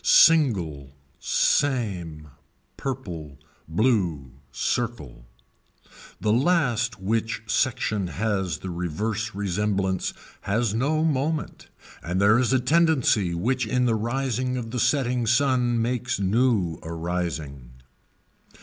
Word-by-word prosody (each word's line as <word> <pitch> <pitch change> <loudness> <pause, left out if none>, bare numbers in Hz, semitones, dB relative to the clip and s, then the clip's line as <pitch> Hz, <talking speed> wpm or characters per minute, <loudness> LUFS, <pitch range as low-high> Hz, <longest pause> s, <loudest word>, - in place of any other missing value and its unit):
Single, 90 - +4 0.2
same, 90 - 0 0.5
purple, 85 - -6 0.3
blue, 85 - 0 0.2
circle. 75 - -3 0.9
The 105 - +1
last 120 - +1
which 110 +2 -1
section 110 -3 0
has 95 -3 -1
the 95 - -6
reverse 100 +6 -3
resemblance 100 -1 -1 0.3
has 105 +1 0
no 145 +7 +1
moment 150 +1 -2 0.3
and 90 +2 -2
there 105 +4 +5
is 125 -1 +1
a 130 - +3
tendency 130 - +2
which 125 +7 0
in 125 +2 +1
the 120 - +2
rising 125 +2 -1
of 115 -2 -5
the 125 - -2
setting 125 -3 +1
sun 120 -1 +2
means 120 0 -1
new 100 -4 +1
arising. 80 -6 -4
110 Hz, 105 wpm, -25 LUFS, 90-125 Hz, 0.9 s, there